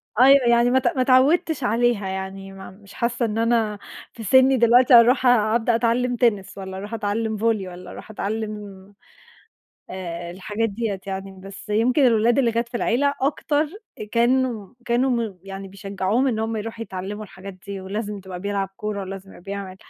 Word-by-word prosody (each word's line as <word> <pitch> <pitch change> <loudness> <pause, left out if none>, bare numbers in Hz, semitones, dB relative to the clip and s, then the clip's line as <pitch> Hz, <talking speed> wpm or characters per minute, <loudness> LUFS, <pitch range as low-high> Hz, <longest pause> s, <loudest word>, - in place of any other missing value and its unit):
أيوه 260 +2 +6
يعني 235 0 +4
ما 260 - +4
ت 255 - -1
ما 260 - +1
اتعوّدتش 275 +4 +3
عليها 235 -3 +1
يعني، 190 0 -6
ما 190 0 -10
مش 200 +1 -17
حاسّة 235 0 -1
إن 220 -1 -3
أنا 225 -2 +1 0.3
في 230 - -9
سِنّي 260 +5 +5
دلوقتي 245 +2 +5
أرُوح 245 +3 +6
أبدأ 230 -1 +3
أتعلّم 245 +2 +1
تنس 215 -6 0
والّا 190 -1 -7
أرُوح 205 +4 -7
أتعلّم 220 0 -2
volley 215 -3 0
والّا 180 0 -10
أرُوح - - -10
أتعلّم 205 -2 -5 1.0
آآ، 175 -2 -6
الحاجات 210 +5 -3
دِيّة 205 -2 -3
يعني، 195 0 -6
بس 195 +2 -11
يمكن 245 +6 +3
الأولاد 235 +2 +3
اللي 240 -4 +2
كانت 235 +1 -1
في 240 - -4
العيلة 280 +5 +1
أكتر، 290 +2 0 0.5
كانوا 235 -3 +1
كانوا 245 +2 +1
م 225 -6 -2
يعني 195 0 -8
بيشجّعوهم 195 +5 -1
إن 235 -5 0
هُم 225 0 -2
يرُوحوا 225 +1 -5
يتعلّموا 200 +1 -6
الحاجات 195 0 -10
دي 200 -1 -5
ولازم 205 +2 -5
تبقى 185 -2 -8
بيلعب 200 0 -2
كورة 210 -1 -4
ولازم 195 0 -8
يبقي - - -14
بيعمل 195 -1 -6
220 Hz, 170 wpm, -23 LUFS, 195-240 Hz, 1.0 s, أيوه